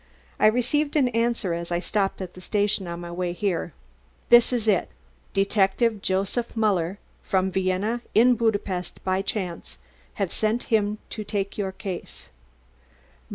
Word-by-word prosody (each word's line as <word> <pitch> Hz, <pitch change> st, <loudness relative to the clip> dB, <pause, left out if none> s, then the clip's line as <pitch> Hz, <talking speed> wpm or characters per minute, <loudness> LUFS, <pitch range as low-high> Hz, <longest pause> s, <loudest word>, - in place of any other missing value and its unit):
I -, -, +6 dB
received 285 Hz, +7 st, +1 dB
an 270 Hz, -4 st, +4 dB
answer 230 Hz, -5 st, 0 dB
as 170 Hz, +1 st, -4 dB
I 175 Hz, -, +2 dB
stopped 195 Hz, 0 st, -1 dB
at 180 Hz, -, -8 dB
the 185 Hz, -, -12 dB
station 205 Hz, -1 st, 0 dB
on 170 Hz, 0 st, -5 dB
my 170 Hz, 0 st, -7 dB
way 175 Hz, 0 st, -2 dB
here. 175 Hz, -2 st, -1 dB, 0.6 s
This 240 Hz, +1 st, +7 dB
is 235 Hz, -3 st, -1 dB
it: 200 Hz, -4 st, +2 dB, 0.4 s
'Detective 200 Hz, +2 st, +2 dB
Joseph 195 Hz, +6 st, -1 dB
Muller 195 Hz, -4 st, +1 dB, 0.2 s
from 190 Hz, -1 st, 0 dB
Vienna 190 Hz, +5 st, 0 dB
in 245 Hz, +3 st, +6 dB
Budapest 205 Hz, -6 st, -1 dB
by 190 Hz, 0 st, +1 dB
chance. 190 Hz, -5 st, -4 dB, 0.4 s
Have 195 Hz, -4 st, -2 dB
sent 220 Hz, +2 st, 0 dB
him 210 Hz, -1 st, +2 dB
to 215 Hz, -, -4 dB
take 200 Hz, -1 st, -3 dB
your 195 Hz, -2 st, -2 dB
case. 190 Hz, -1 st, -7 dB
200 Hz, 150 wpm, -25 LUFS, 185-225 Hz, 0.6 s, This